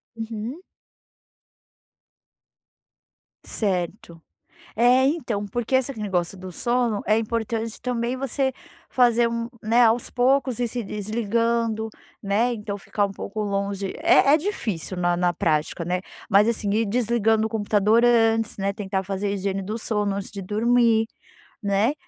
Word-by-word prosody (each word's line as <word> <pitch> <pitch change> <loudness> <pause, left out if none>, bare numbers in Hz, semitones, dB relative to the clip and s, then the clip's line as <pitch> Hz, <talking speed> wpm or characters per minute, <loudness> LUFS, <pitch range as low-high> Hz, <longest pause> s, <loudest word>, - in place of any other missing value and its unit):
Uhum. 225 - -5 2.8
Certo. 180 -4 -3 0.5
É, 250 +3 +5
então, 240 -9 -1
porque 240 +5 -1
esse 260 -1 0
negócio 190 -2 -1
do 185 0 -8
sono 235 +2 0
é 215 +1 +3
importante 225 0 -2
também 245 0 -1
você 270 0 -1 0.4
fazer 240 -2 +4
um 230 0 -3
né, 230 +3 +4
aos 230 +2 +2
poucos 255 -1 +1
ir 240 - +1
se 240 +1 -4
desligando, 220 +2 -1 0.3
né. 220 +5 +1
Então 210 -2 -5
ficar 205 +1 -1
um 195 - -5
pouco 205 +2 -5
longe 200 -1 -2
é 310 -3 +5
é 310 - +6
difícil 225 - -3
na 175 0 +1
na 175 0 +1
prática, 160 -1 0
né. 180 +1 -1 0.3
Mas 205 +3 +5
assim, 215 -3 -1
ir 225 +1 +2
desligando 225 -1 +1
o - - -13
computador 215 +1 +2
antes, 225 -2 +3
né, 195 0 0
tentar 195 -2 -3
fazer 195 +1 -3
a 200 - 0
higiene 195 0 -2
do 210 +4 -4
sono 210 -3 -1
antes 200 -1 -5
de 200 -2 -6
dormir, 225 +2 +3 0.6
né. 205 +6 +2
220 Hz, 140 wpm, -24 LUFS, 200-235 Hz, 2.8 s, é